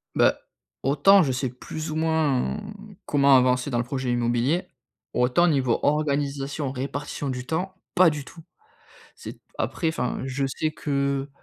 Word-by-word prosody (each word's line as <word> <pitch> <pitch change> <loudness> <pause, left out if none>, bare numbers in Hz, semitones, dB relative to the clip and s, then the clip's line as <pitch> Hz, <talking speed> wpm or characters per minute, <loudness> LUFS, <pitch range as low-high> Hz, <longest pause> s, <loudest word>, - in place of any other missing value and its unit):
Bah, - - +4 0.5
autant 150 +9 +5
je 135 - 0
sais 130 0 -1
plus 155 +6 -7
ou - - -4
moins 160 -5 +1 0.5
comment 140 -2 +5
avancer 125 +1 +2
dans 120 - -1
le 120 - +1
projet 130 -1 -2
immobilier. 120 +7 +1 0.5
Autant 125 +8 +3
niveau 135 -7 +2
organisation, 145 -1 0
répartition 140 +2 -4
du 125 -1 -4
temps, 180 +6 -3 0.2
pas 185 -2 +7
du 150 -3 -5
tout. 165 - -13 0.7
C'est - - -10 0.2
après, 165 - -1
enfin, 160 - -2
je 135 +1 -2
sais 155 +4 -2
que 140 -2 -1
140 Hz, 145 wpm, -25 LUFS, 130-155 Hz, 0.7 s, pas